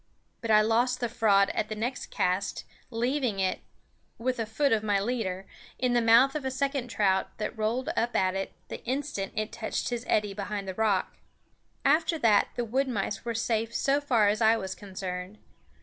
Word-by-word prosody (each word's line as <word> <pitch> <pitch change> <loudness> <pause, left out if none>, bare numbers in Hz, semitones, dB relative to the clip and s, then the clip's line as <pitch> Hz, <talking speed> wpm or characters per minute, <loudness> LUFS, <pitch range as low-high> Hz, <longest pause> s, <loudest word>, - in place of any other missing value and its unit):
But 230 - -4
I 215 -1 +7
lost 240 +3 +2
the 240 - 0
fraud 210 -4 +3
at 215 - -2
the 215 - -3
next 240 +4 -3
cast, 185 +2 -1 0.2
leaving 245 -2 -1
it, 190 -1 0 0.6
with 250 +1 -2
a 225 - -1
foot 275 +6 +1
of 220 -1 +3
my 205 -2 +1
leader, 195 -4 -2 0.3
in 250 -1 +1
the 240 - +3
mouth 235 +4 +6
of 305 - -3
a 265 - -1
second 275 -1 -1
trout 195 -4 0
that 215 +3 -3
rolled 225 +4 -1
up 240 +1 0
at 185 -1 +2
it 195 0 -3 0.2
the - - -7
instant 260 -6 -3
it 215 0 -2
touched 220 -1 -3
his 240 -1 -3
eddy 210 -2 +1
behind 200 0 -4
the 190 - -3
rock. 205 -2 0 0.7
After 320 +3 +3
that 225 -7 +4
the 240 - -1
wood 265 +5 0
mice 205 -4 -2
were 235 -1 -3
safe 225 0 -1
so 280 +1 +2
far 235 -7 +3
as 210 +3 +1
I 225 +1 +5
was 190 -3 -4
concerned. 185 -1 -6
225 Hz, 195 wpm, -28 LUFS, 205-250 Hz, 0.7 s, I